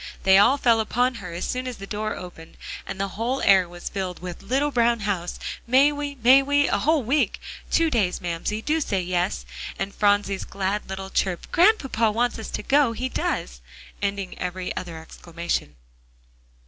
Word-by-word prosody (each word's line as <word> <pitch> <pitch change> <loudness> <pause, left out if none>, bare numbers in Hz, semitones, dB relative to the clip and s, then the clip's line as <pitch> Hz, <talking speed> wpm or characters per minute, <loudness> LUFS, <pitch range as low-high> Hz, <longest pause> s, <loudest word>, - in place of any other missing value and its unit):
They 190 0 +6
all 245 +7 +5
fell 235 -4 +3
upon 245 +3 +1
her, 180 -2 -7
as 170 - -3
soon 255 0 -3
as 250 - -5
the 195 - -8
door 215 +1 -3
opened, 175 -3 -11 0.3
and 195 0 -6
the 195 0 -1
whole 235 +7 -2
air 190 -3 +5
was 175 0 -9
filled 185 -3 -3
with 180 -1 -7
"little 270 +8 0
brown 235 -2 +2
house." 190 -4 -2 0.3
"May 270 +4 +5
we 290 -1 -4
may 260 +3 +8
we?" 285 +1 +2
"A 200 - +1
whole 305 +4 +2
week." 275 +7 +1 0.3
"Two 330 -1 +2
days, 200 -7 +1
Mamsie, 175 +5 -3
do 315 +1 +1
say 200 -9 0
yes," 175 - -1 0.3
and 200 - -3
Phronsie's 205 -1 +1
glad 195 +1 -3
little 190 0 -6
chirp 185 -3 -1
"Grandpapa 295 - +3
wants 230 0 -1
to - - -4
go, 280 -4 +3
he 255 +3 -3
does!" - - -3 0.4
ending 200 -2 -2
every 180 0 -4
other 170 -3 -5
exclamation. 170 +1 -4
205 Hz, 175 wpm, -24 LUFS, 185-255 Hz, 0.4 s, may